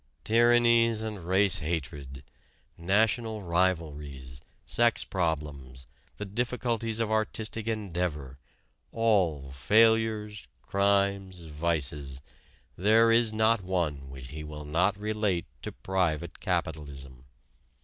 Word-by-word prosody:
Tyrannies 115 -1 +4
and 105 -5 -5
race 95 +1 +3
hatred, 70 -4 -5 0.5
national 110 +4 0
rivalries, 75 -7 -2 0.2
sex 120 -1 +3
problems, 75 -7 -3 0.3
the 105 - -5
difficulties 115 +1 -2
of 110 -1 -1
artistic 110 0 -2
endeavor, 85 - -3 0.5
all 90 -12 +1
failures, 110 +5 +2 0.2
crimes, 100 -2 +1
vices 75 -4 -2 0.6
there 110 +4 +4
is 115 -1 +4
not 110 0 +2
one 80 -7 -2
which 65 -1 -10
he 75 +2 -7
will 75 -1 -8
not 90 +7 +1
relate 105 -4 -1 0.2
to - - -5
private 90 -5 -2
capitalism. 70 -4 -4
95 Hz, 100 wpm, -28 LUFS, 75-110 Hz, 0.6 s, Tyrannies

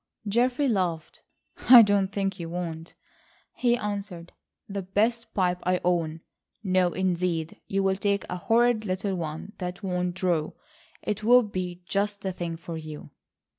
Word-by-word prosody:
Geoffrey 245 +6 +2
laughed. 180 -8 -1 0.5
"I 245 -2 +12
think 195 -2 0
you 165 -1 -5
won't," 165 -1 -5 0.6
he 240 -1 +2
answered. 200 -5 -5 0.4
"The 200 -1 -4
best 220 +5 0
pipe 180 -2 +1
I 180 0 +1
own! 165 -2 0 0.4
No, 185 -2 +3
indeed, 175 -3 -1
you'll 195 -1 +1
take 200 0 0
a 180 - -4
horrid 230 +3 +2
little 190 0 -2
one 165 +3 -5
that 180 +2 -5
won't 180 -2 -1
draw. 175 -5 0 0.5
It 210 0 -3
will 245 +3 +6
be 180 -4 -5
just 200 +4 -1
the 190 - -2
thing 170 -2 -4
for 170 0 -7
you." 155 -1 -9
185 Hz, 140 wpm, -26 LUFS, 175-205 Hz, 0.6 s, I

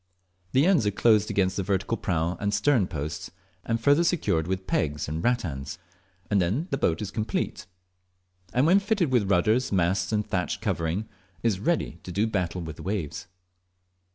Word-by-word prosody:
The 135 +4 +4
ends 170 - +4
are - - +4
closed 105 +1 +3
against 95 -1 +1
the - - +1
vertical 95 +3 0
prow 85 -4 -1
and 100 0 0
stern 110 -2 +3
posts, 75 -2 -5 0.3
and 115 0 -1
further 145 +6 +4
secured 115 - +1
with 95 0 -2
pegs 75 -4 -1
and 80 +3 -3
rattans, 85 - -1 0.5
and 100 -2 +2
then 110 - 0
the 135 - +1
boat 85 +4 +1
is 100 - -5
complete; 110 -4 -3 0.8
and 125 +3 +2
when 185 +5 +6
fitted 200 -7 0
with 105 -6 +2
rudders, 105 +7 +2
masts, 90 -1 +1
and 105 -1 0
thatched 90 -1 -1
covering, 85 +7 -1 0.4
is 110 -5 +1
ready 155 - -1
to 90 - -8
do 100 +5 +1
battle 90 -5 -2
with, 80 -2 -7
the - - -9
waves. 90 -5 -3
100 Hz, 175 wpm, -26 LUFS, 85-120 Hz, 0.8 s, when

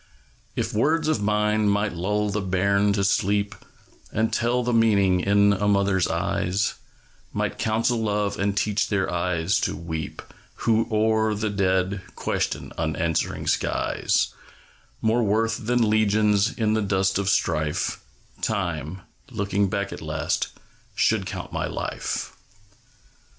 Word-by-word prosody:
If - - -2
words 155 +8 +2
of 155 -9 +1
mine 105 0 +2
might 105 -1 +1
lull 105 +4 -1
the 105 +1 -1
bairn 100 +2 +2
to 100 -1 0
sleep, 100 +1 +1 0.6
And 110 +1 0
tell 120 +1 +1
the 120 0 0
meaning 100 -5 +4
in 100 +2 +4
a 100 +1 0
mother's 100 -3 +2
eyes; 95 +3 0 0.6
Might - - -2
counsel 115 +2 +1
love, 105 -1 0
and 100 0 0
teach 105 +1 +1
their 95 -3 0
eyes 90 +2 +1
to - - -1
weep 80 -2 -5 0.4
Who, 115 0 +3
o'er 110 0 +2
their 105 0 -2
dead, 95 0 +1
question - - -2
unanswering 80 0 -1
skies, - - +1 0.7
More 115 +2 +3
worth 115 +1 0
than 120 -2 +3
legions 105 0 +3
in 110 -2 0
the 110 - +1
dust 95 -1 +1
of 100 0 0
strife, 75 -5 0 0.4
Time, 85 - -2 0.3
looking 100 0 0
back 100 +1 -2
at - - -8
last, - - -1 0.5
should - - +2
count - - -6
my - - -1
life. - - -4
100 Hz, 135 wpm, -24 LUFS, 95-110 Hz, 0.7 s, meaning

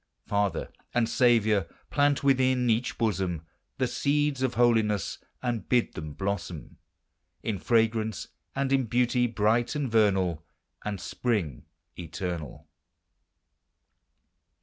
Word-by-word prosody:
Father 100 -1 -1 0.2
and 120 -2 +3
Saviour! 110 -6 +3 0.2
plant 145 -1 +2
within 130 -2 +3
each 115 +3 0
bosom 95 -7 -1 0.3
The 130 - +1
seeds 140 +2 0
of 130 -2 0
holiness, 110 -4 +2 0.2
and 120 -3 -2
bid 125 -2 +2
them 75 -1 -6
blossom 90 -2 -4 0.6
In 105 -4 -2
fragrance 110 0 +1 0.3
and 135 0 0
in 135 -2 +3
beauty 125 +1 +2
bright 115 +2 +1
and 140 -5 -2
vernal, 95 -7 +2 0.4
And 105 -2 -3
spring 90 - -2 0.3
eternal. 85 -3 -5
110 Hz, 105 wpm, -28 LUFS, 95-125 Hz, 0.6 s, and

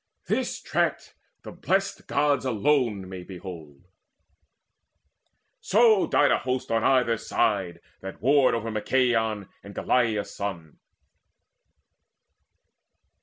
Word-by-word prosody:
This - - -2
track - - -2 0.3
the - - -8
Blest - - -2
Gods 145 -3 +1
may 130 - -1
alone 115 -5 +1 0.2
behold. 85 -7 -10 1.8
So 220 -1 +4
died 145 - +3
a - - +2
host 130 -2 -3
on 115 -1 +1
either 125 -3 +3
side 95 -6 -1 0.2
that 95 0 -9
warred 135 0 +3
Over 115 0 -3
Machaon 110 -2 0
and 100 0 -12
Aglaia's 115 -5 0
son. 85 -6 -6
115 Hz, 100 wpm, -25 LUFS, 100-130 Hz, 1.8 s, So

